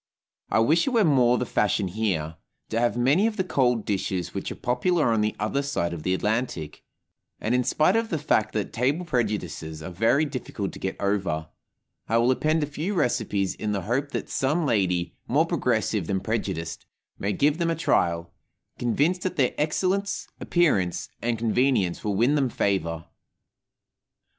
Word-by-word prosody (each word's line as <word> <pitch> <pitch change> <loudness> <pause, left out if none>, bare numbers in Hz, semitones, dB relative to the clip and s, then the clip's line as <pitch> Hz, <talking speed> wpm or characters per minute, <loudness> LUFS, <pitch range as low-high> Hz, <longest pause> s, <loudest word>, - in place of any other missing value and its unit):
I - - +2
wish 160 - +3
it - - +4
were 235 -4 +3
more 125 -7 +4
the 125 - -1
fashion 105 -3 +1
here 90 -6 -2 0.3
to 115 - 0
have 120 0 +1
many 140 - +3
of 225 -1 -3
the 190 - +1
cold 125 - +1
dishes 95 -3 -2
which - - -4
are - - -5
popular 125 +3 +1
on 110 - +2
the 105 0 0
other 110 +7 0
side 140 -12 -1
the 95 +4 +1
Atlantic; 105 - -2 0.6
and, 110 - -1
in 125 0 +3
spite 155 - +3
of 225 0 +1
the 165 - 0
fact 110 -7 +1
that 105 -3 -2
table 140 +9 0
prejudices 100 - -2
are 95 - -6
very 115 - +2
difficult 125 -8 -4
to - - -10
get 95 - -4
over, 95 -6 -1 0.6
I 115 - +3
will 120 +2 +4
append 155 +4 +1
a - - +2
few 155 +8 -3
recipes 110 - 0
in 105 -1 -3
the 100 - -1
hope 135 +7 -1
that - - -4
some 150 +5 0
lady, 90 -8 +1
more - - +3
progressive - - 0
than 95 -1 0
prejudiced, 95 -6 -3 0.3
may 100 - -1
give 145 - +2
them 170 -1 +1
a 165 - +1
trial, 85 - 0 0.5
convinced 145 +9 +1
that 185 -1 -2
their 135 -6 +2
excellence, 185 +6 0
appearance, 105 - +1
and 120 -1 0
convenience 115 -5 +1
will 105 -2 -1
win 120 +8 +3
them 140 -4 +2
favor. 85 -7 -1
120 Hz, 175 wpm, -25 LUFS, 100-150 Hz, 0.6 s, it